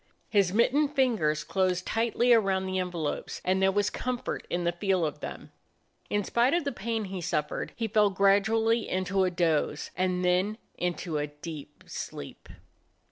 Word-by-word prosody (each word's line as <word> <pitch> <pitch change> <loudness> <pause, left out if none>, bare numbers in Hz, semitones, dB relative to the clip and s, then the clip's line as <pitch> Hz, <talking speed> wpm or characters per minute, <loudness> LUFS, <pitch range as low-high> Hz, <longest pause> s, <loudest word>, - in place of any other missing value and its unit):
His 200 -4 +3
mittened 280 +7 +2
fingers 185 - +2
closed 185 -1 0
tightly 235 +2 +2
around 195 -4 +2
the 185 0 -1
envelopes, 175 -5 -3
and 190 +1 +2
there 190 0 +4
was 205 +1 +1
comfort 250 -1 -3
in 175 0 -1
the 170 - +2
feel 185 -1 +1
of 150 - -4
them. - - -7 0.6
In 205 0 +1
spite 240 - +2
of 345 - +1
the 280 - -1
pain 225 -1 -2
he 190 -2 -5
suffered 150 -3 -2
he 230 - -2
fell 210 -1 +4
gradually 220 +4 +3
into 185 +1 +1
a - - +2
doze, 165 -4 0
and 185 0 0
then 185 +4 +2 0.2
into 175 -3 -2
a 145 - -1
deep 150 0 -9
sleep. 70 - -8
190 Hz, 165 wpm, -28 LUFS, 175-225 Hz, 0.6 s, there